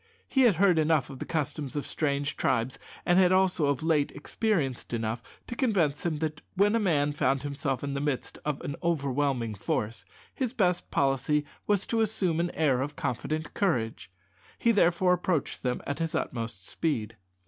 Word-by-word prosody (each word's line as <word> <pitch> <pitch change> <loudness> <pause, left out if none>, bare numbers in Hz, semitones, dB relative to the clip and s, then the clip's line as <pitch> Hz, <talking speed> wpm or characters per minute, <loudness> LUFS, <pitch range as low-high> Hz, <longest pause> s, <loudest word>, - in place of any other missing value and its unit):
He 265 - +2
had 200 - +1
heard 180 -2 +4
enough 155 -4 +2
of 135 - -9
the - - -5
customs 150 -3 -2
of 145 - -2
savage 140 -2 -1
tribes, 115 +3 0 0.3
and 175 +1 +4
had 185 -1 +5
also 185 -5 +3
of 140 +1 0
late 155 -3 +2
experienced 145 - -1
enough, 115 0 -2 0.2
to 240 - -6
convince 185 - +1
him 165 -3 0
that 155 -1 -3
when 205 +3 +4
a - - +3
man 150 -8 +2
found 135 -2 +1
himself 140 -2 -2
in 140 -1 -2
the 140 - -2
midst 145 -3 -2
of 150 -2 -2
an 140 - -4
overwhelming 140 -7 0
force, 105 +2 -2 0.3
his 255 -3 -2
best 180 -7 +1
policy 140 +2 +1 0.2
was 205 -2 +2
to 225 -1 0
assume 190 -6 +1
an 175 +1 +1
air 135 -5 +2
of 145 +2 -3
confident 150 +5 -3
courage. 115 - -1 0.5
He 235 - +3
therefore 180 -3 +4
approached 180 -4 -1
them 125 -1 -2
at 145 +2 -3
his 165 -1 -1
utmost 115 -6 -3
speed. 115 -9 -2
150 Hz, 180 wpm, -28 LUFS, 135-175 Hz, 0.5 s, had